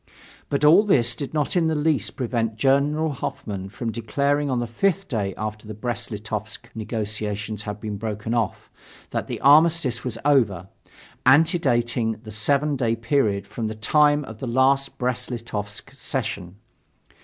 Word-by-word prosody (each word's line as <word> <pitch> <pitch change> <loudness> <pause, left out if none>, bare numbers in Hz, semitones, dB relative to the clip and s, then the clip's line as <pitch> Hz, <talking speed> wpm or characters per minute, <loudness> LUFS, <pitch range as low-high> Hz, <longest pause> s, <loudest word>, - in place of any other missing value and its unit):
But 140 +1 +1
all 165 +7 +8
this 120 - +3
did 135 +3 -5
not 150 +1 -1
in 170 -2 +3
the 160 - +1
least 150 -7 0
prevent 115 -3 -1
General 140 +6 +2
Hoffmann 100 -7 -5
from 115 +3 -4
declaring 140 +6 0
on 125 -2 0
the 120 - -1
fifth 195 - 0
day 100 -6 -2
after 105 0 -5
the 110 - -6
Brest 120 0 -4
Litovsk 110 +1 -6
negotiations 105 -2 -3
had 105 0 -5
been 105 -1 -4
broken 110 +1 -3
off 115 -6 -2 0.4
that - - -2
the - - -4
armistice 145 -4 +5
was 120 -3 -4
over, 105 -11 +2 0.5
antedating 130 -6 +3
the 110 - -9
seven 140 +8 +1
day 115 -4 +1
period 115 -5 +1
from 110 +2 -4
the 110 - -4
time 145 +6 +3
of 110 -2 -10
the 130 - -4
last 135 +3 +2
Brest 125 -1 -2
Litovsk 110 -1 -5
session. 110 -10 -4
120 Hz, 155 wpm, -24 LUFS, 110-140 Hz, 0.5 s, all